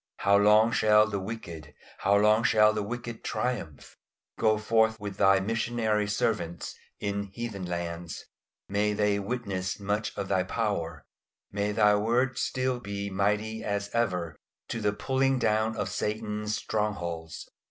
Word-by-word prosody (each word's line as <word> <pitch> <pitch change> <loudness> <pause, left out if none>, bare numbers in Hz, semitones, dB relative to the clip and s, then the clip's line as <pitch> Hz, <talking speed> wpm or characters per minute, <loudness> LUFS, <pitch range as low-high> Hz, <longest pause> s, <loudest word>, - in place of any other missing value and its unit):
How 100 - +3
long 105 +2 +5
shall 105 -1 +5
the 100 -2 -3
wicked, 85 - -7 0.2
how 100 +1 +3
long 105 +2 +4
shall 105 -2 +5
the 105 - -1
wicked 120 +2 -6
triumph? 110 - -4 0.4
Go 110 -1 +3
forth 110 +1 +2
with 100 -2 -6
Thy 95 -1 +5
missionary 110 0 0
servants 105 -4 -1 0.3
in 100 0 -2
heathen 105 -4 -5
lands; 85 -1 -5 0.4
may 105 +1 +1
they 105 -1 +1
witness 100 -4 -3
much 105 +1 -2
of 95 - -3
Thy 95 - +2
power; 90 -7 -2 0.5
may 100 +1 -1
Thy 105 -1 +4
word 120 +5 +1
still 130 -1 -1
be 100 -2 -5
mighty 105 +3 0
as 100 0 -2
ever 90 -9 0 0.3
to 115 - -3
the 105 -1 +2
pulling 135 +5 +1
down 110 -1 +1
of 105 - -1
Satan's 105 0 -2
strongholds. 85 -7 -3
105 Hz, 140 wpm, -28 LUFS, 100-110 Hz, 0.5 s, long